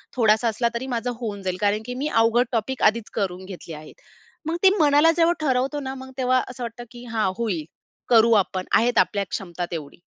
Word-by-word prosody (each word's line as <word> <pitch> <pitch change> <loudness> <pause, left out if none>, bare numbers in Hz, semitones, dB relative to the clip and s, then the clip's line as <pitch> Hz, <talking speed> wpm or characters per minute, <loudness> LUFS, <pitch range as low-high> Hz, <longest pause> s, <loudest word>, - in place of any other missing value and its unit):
थोडासा 225 -1 +3
असला 230 +2 0
तरी, 250 +3 -4
माझं 245 0 -2
होऊन 205 -3 -4
जाईल. 185 -1 -2
कारण, 205 +1 +1
की 250 - -5
मी 300 - 0 0.2
अवघड 240 +2 +3
टॉपिक 245 +2 -2
आधीच 220 +1 +2
करून 190 -3 -3
घेतली 180 -4 -9
आहेत." 155 0 -12 0.5
मग 335 - -1
ते 385 - +8
मनाला 295 +1 +5
जेव्हा 335 +1 +4
ठरवतो 270 0 0
ना 265 -1 -5
मग, 260 0 -10
तेव्हा 255 0 +2
असं 250 0 -7
वाटतं, 235 +1 -6
की 240 0 -11
"हां, 215 -4 +1
होईल, 195 -10 -2 0.4
करू 230 -1 +5
आपण, 185 0 -6
आहेत 240 +2 +3
आपल्या 200 -1 +1
क्षमता 175 -2 -4
तेवढी." 155 -1 -7
230 Hz, 200 wpm, -23 LUFS, 200-255 Hz, 0.5 s, ते